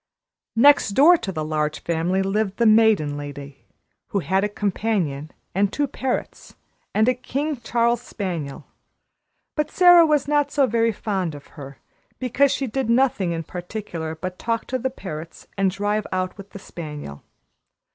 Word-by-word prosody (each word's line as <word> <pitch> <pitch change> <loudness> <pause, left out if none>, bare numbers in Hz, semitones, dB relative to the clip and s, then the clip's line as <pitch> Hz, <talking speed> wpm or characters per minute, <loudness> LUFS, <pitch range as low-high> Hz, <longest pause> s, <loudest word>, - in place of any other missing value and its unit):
Next 285 +1 +6
door 320 +6 +7
to 195 - -5
the 155 -4 -3
Large 155 -1 -2
Family 170 +3 0
lived 195 0 -1
the 235 - +2
Maiden 215 -10 +4
Lady, 145 -1 -9 0.4
who - - -2
had 190 +3 +1
a 210 - 0
companion, 195 -8 -2 0.2
and 200 +1 +1
two 290 - 0
parrots, 260 -2 -4 0.4
and 220 +2 +2
a 255 - +4
King 280 +4 -3
Charles 235 0 +1
spaniel; 170 - -5 0.9
but 300 -1 0
Sara 355 -2 +7
was 300 -4 +2
not 290 -1 +2
so 280 -1 +3
very 230 -1 +1
fond 190 -6 -3
of 145 - -13
her, 140 -2 -10 0.4
because 255 +2 +2
she 275 - -1
did 260 0 -2
nothing 235 -7 +2
in 165 -1 -3
particular 175 -2 -6
but 180 +3 -6
talk 230 -1 -2
to 255 - -2
the 260 +2 -1
parrots 165 -9 -8
and 195 -1 +2
drive 205 +2 -1
out 185 0 -2
with 200 0 -11
the - - -10
spaniel. 150 - -8
200 Hz, 160 wpm, -23 LUFS, 165-245 Hz, 0.9 s, door